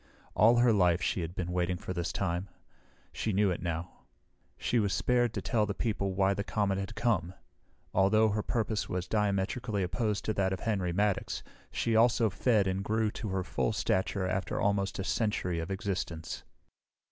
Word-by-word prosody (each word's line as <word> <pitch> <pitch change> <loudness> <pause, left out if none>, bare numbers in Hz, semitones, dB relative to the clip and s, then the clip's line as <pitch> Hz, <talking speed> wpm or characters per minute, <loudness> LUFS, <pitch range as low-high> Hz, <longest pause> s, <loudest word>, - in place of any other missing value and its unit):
All 115 +3 +6
her 120 -1 +5
life 90 -4 +4
she 90 0 -1
had 85 +2 -5
been 90 -2 -3
waiting 90 0 0
for 90 - -5
this 85 -1 -2
time. 90 0 -2 0.6
She 110 - -1
knew 100 0 +3
it 90 - -3
now. 85 0 -5 0.5
She 120 - +1
was 100 -3 +1
spared 120 -2 +2
to - - -3
tell 110 -4 +1
the 100 - -3
people 100 -4 -1
why 95 0 +3
the 100 - -2
comet 100 -2 0
had 100 +4 -5
come. 95 -7 0 0.6
Although 110 +3 +4
her 105 +1 0
purpose 110 -1 -1
was 90 0 -2
diametrically 105 +1 0
opposed 105 +3 -1
to 110 - 0
that 95 -1 +1
of 95 - -5
Henry 95 -5 0
Maddox, 100 +2 0 0.3
she 115 - 0
also 115 -1 +4
fed 105 +1 +2
and 95 +1 -1
grew 110 +1 +1
to 105 - -5
her 95 -1 -1
full - - -1
stature 95 0 0
after 95 0 -2
almost 100 -1 +1
a 95 - -2
century 90 -2 0
of 80 +2 -4
existence. 95 -5 -3
100 Hz, 180 wpm, -30 LUFS, 90-110 Hz, 0.6 s, All